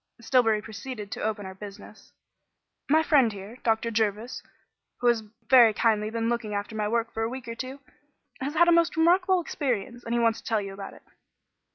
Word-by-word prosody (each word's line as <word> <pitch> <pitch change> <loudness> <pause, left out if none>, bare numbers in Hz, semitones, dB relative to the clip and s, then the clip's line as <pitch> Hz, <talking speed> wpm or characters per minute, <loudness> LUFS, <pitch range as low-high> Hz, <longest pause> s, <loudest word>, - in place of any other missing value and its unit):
Stillbury 225 -3 +2
proceeded 215 -1 -7
to - - -5
open 210 -2 -2
our 190 - -7
business. 200 +1 -12 0.8
"My 315 +2 +4
friend 275 -8 +4
here, 205 +4 -9
Dr. 230 -1 0
Jervis, 220 +1 -1 0.6
who - - -5
has 240 -2 +4 0.3
very 240 -5 +7
kindly 215 -2 +2
been 225 0 -2
looking 230 -3 -2
after 205 +2 -4
my 210 -1 -1
work 230 +1 -1
for 225 - -3
a 225 - 0
week 255 -1 -7
or 230 - -4
two, 260 +4 -7 0.6
has 280 +4 -4
had 345 +2 +5
a - - +6
most 335 -1 +3
remarkable 360 +3 +4
experience, 245 - -3
and 230 +1 -2
he - - +2
wants 230 -1 +2
to - - -13
tell 225 -2 +1
you 195 -1 -6
about 195 0 -8
it." - - -18
230 Hz, 200 wpm, -27 LUFS, 215-260 Hz, 0.8 s, very